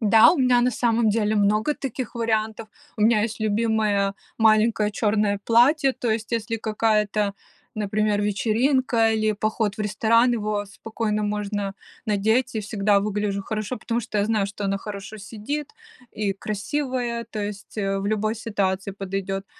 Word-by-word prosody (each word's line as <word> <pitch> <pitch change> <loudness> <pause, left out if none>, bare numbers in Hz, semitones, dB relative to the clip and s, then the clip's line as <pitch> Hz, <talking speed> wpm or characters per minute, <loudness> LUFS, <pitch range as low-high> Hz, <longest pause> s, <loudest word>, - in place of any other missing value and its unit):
Да, 220 0 +7
у - - -1
меня 250 -2 +4
на 250 +1 +2
самом 230 -1 +1
деле 215 0 +1
много 210 +7 +2
таких 260 -3 -5
вариантов. 220 -1 -1 0.3
У - - -7
меня 215 -1 +4
есть 225 0 -3
любимое 215 -2 +1 0.2
маленькое 215 -1 +3
черное 210 -1 +1
платье, 265 +4 +4
то 240 -3 -2
есть 220 0 -2
если 230 -1 -1
какая-то, 215 -2 0 0.4
например, 210 0 0
вечеринка 230 +3 +2
или 215 -1 +1
поход 215 0 -1
в - - -6
ресторан, 225 +3 +3
его 210 -2 -2
спокойно 215 +1 -3
можно 205 -1 -2 0.3
надеть, 220 +5 +1
и 220 - -1
всегда 205 -1 +1
выгляжу 205 -1 -2
хорошо, 215 +4 -3
потому 230 +1 -2
что 210 -2 -3
я 205 - +2
знаю, 215 -2 +1
что 200 +1 -6
оно 195 0 0
хорошо 200 +1 -7
сидит 225 +8 -5 0.4
и 205 -2 -1
красивое, 235 +4 -3
то 220 -1 -6
есть, 205 +1 -7
э, 195 -1 0
в 195 - -3
любой 215 +1 0
ситуации 200 -3 -2
подойдет. 195 0 -4
215 Hz, 155 wpm, -24 LUFS, 205-230 Hz, 0.4 s, Да